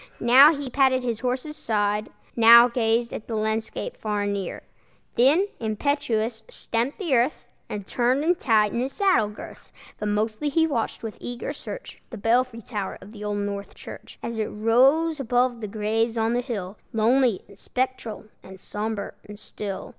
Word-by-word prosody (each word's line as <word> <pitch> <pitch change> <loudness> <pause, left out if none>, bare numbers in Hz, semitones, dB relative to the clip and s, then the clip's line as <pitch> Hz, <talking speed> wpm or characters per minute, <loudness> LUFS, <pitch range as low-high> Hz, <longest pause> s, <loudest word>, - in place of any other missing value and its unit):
Now 260 +6 +8
he 285 -1 -5
patted 260 0 +2
his 235 -3 -2
horse's 255 +4 -3
side, 210 -4 -1 0.3
Now 235 +1 +9
gazed 235 -1 0
at 215 - -7
the 225 - -3
landscape 220 - -2
far 210 -1 -2
and 205 0 -1
near, 195 -3 -5 0.5
Then, 280 +11 +4
impetuous, 225 -1 -1
stamped 235 +5 -2
the 355 -9 -2
earth, 245 +5 +1 0.2
And 205 -2 -5
turned 250 +6 +1
and 350 +2 +2
tightened 220 -1 +2
his 265 +2 -2
saddle 385 - +3
girth; 210 - -11 0.3
But 210 - -2
mostly 215 +6 -1
he 320 +3 +3
watched 245 -9 -2
with 220 -2 -6
eager 245 0 -5
search - - -9
The 235 - -8
belfry 230 +2 +1
tower 205 -4 -4
of 200 - -13
the 210 -2 -10
Old 205 0 -2
North 200 0 -4
Church, - - -11
As 230 -1 -4
it 215 - +1
rose 270 +9 +3
above 245 -1 +1
the 210 - -4
graves 220 +2 -1
on 225 +1 +1
the 245 - +1
hill, 210 -6 -5
Lonely 230 -1 +2
and 200 0 -17
spectral 250 -4 -3 0.2
and 190 0 -12
sombre 210 +1 -4 0.2
and 205 - -8
still. 205 -2 -6
230 Hz, 170 wpm, -24 LUFS, 210-255 Hz, 0.5 s, Now